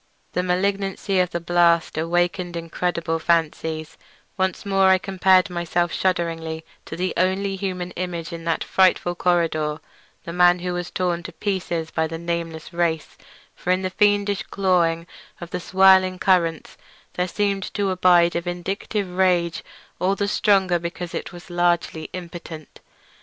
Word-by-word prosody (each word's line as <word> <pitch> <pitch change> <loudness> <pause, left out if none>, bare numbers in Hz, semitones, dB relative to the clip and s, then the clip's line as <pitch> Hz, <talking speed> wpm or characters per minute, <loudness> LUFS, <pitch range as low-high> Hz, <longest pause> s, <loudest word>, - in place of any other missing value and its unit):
The 180 - +1
malignancy 195 +1 0
of 180 -1 +2
the 170 - -3
blast 170 -1 +2
awakened 175 +2 0
incredible 165 0 -2
fancies; 160 -1 -1 0.4
once 190 0 -1
more 195 -1 +3
I 190 0 +6
compared 190 0 +3
myself 175 0 -1
shudderingly 165 -3 -1 0.2
to - - -7
the 180 +1 -2
only 190 +2 +1
other 190 - -6
human 180 -2 -3
image 175 -2 -5
in 165 0 -7
that 165 -1 0
frightful 185 -2 +2
corridor, 165 -4 0 0.4
the 170 - -6
man 175 0 +5
who 180 0 -3
was 175 0 -4
torn 175 -2 -1
to 175 +1 -8
pieces 175 -5 -3
by 160 0 0
the 165 +1 -5
nameless 170 -1 -4
race, 170 -2 -1 0.4
for - - -7
in 185 +1 +2
the 185 - -2
fiendish 205 0 +2
clawing 170 -4 +1 0.3
of 175 -1 -9
the - - -2
swirling 190 0 +4
currents 175 -4 +1 0.4
there 180 0 -1
seemed 200 +1 -1
to 200 -2 0
abide 175 -2 +4
a 170 - 0
vindictive 185 +3 -3
rage 180 -2 +1 0.4
all 190 +2 +1
the 200 0 -1
stronger 195 -4 +2
because 170 0 -6
it - - -5
was 175 0 -12
largely 175 -2 0
impotent. 170 -3 -9
175 Hz, 150 wpm, -23 LUFS, 170-185 Hz, 0.4 s, I